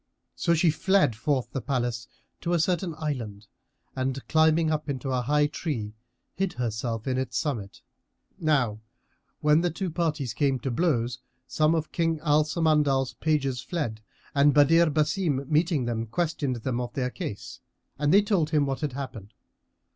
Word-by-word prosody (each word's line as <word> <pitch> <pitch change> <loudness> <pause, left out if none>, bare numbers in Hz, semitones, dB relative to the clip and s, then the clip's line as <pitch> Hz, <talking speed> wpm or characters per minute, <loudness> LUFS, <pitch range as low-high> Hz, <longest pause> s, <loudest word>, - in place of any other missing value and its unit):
So 170 -1 +2
she 165 0 +4
fled 185 - +2
forth 130 +3 -1
the 135 - -3
palace 120 -3 -2 0.3
to 175 - -2
a 170 - +3
certain 175 0 0
island, 115 -10 -4 0.5
and 130 0 -3
climbing 160 0 +3
up 155 -1 -2
into 135 -1 -3
a 130 -1 +1
high 150 +4 +2
tree, 140 -8 -3 0.4
hid 195 -1 -1
herself 115 -1 -3
in 130 0 0
its 130 - -2
summit. 115 -10 -3 0.6
Now 135 -9 +1 0.6
when 150 +1 +4
the 175 - +1
two 175 +2 -4
parties 155 -7 -1
came 135 -1 +1
to 135 - -2
blows, 120 -4 0 0.3
some 155 +1 +2
of 160 -1 -2
King 165 -2 0
Al 150 -1 +4
Samandal's 150 -5 +2
pages 135 -3 0
fled 130 -7 -3 0.3
and 145 +1 +4
Badr 165 +4 +6
Basim 150 -2 0
meeting 155 -3 +2
them, 115 -1 -2
questioned 150 0 -1
them 120 +1 -2
of 120 -1 -5
their 125 -2 -1
case 105 - -6 0.4
and 145 0 +2
they 200 +3 +6
told 190 -7 +1
him 150 -3 +2
what 135 -1 -3
had 150 -4 -2
happened. 115 -7 -7
145 Hz, 160 wpm, -27 LUFS, 125-160 Hz, 0.6 s, Badr